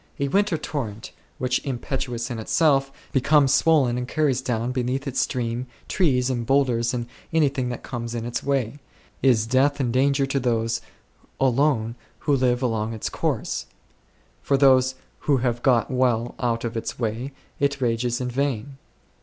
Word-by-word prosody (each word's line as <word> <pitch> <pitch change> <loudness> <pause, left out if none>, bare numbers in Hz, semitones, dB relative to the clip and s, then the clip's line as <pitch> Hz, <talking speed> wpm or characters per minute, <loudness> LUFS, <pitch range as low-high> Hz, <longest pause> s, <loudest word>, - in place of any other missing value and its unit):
A 140 0 0
winter 200 +1 +2
torrent2, 115 -10 -5 0.3
which, 125 0 0
impetuous 125 -2 -3
in 115 - -4
itself, 135 +3 +2 0.2
be 135 - +2
comes 140 0 +4
swollen 135 -7 +3
and 125 - -4
carries 140 -3 +1
down 120 -1 -1
beneath 130 +2 -1
its 135 -2 -2
stream 120 -1 -1 0.2
trees 130 -8 +2
and 120 -2 -1
boulders 120 -2 +2
and 120 -2 -2 0.3
anything 140 -6 +1
that 120 - -5
comes 120 -1 -5
in 115 -1 -3
its 120 - -3
way, 135 -1 -1 0.4
is 120 -5 +4
death 135 +5 +2
and 125 -4 0
danger 135 +2 +3
to 135 0 -1
those 115 -2 0 0.6
alone 130 -3 +2 0.3
who 145 -2 +2
live 125 -1 +1
along 115 -2 -1
its 110 - -3
course; - - -2 0.7
for 140 - +2
those 130 -1 +5 0.2
who' 145 -2 +2
have 120 -1 -1
got 120 -4 +3
well 120 -2 +1
out 115 -2 0
of 115 0 -4
its 115 - -4
way 120 +3 -2 0.3
it 140 -1 +1
rages 120 -1 0
in 125 -1 -3
vain. 135 0 -2
125 Hz, 160 wpm, -24 LUFS, 120-140 Hz, 0.7 s, those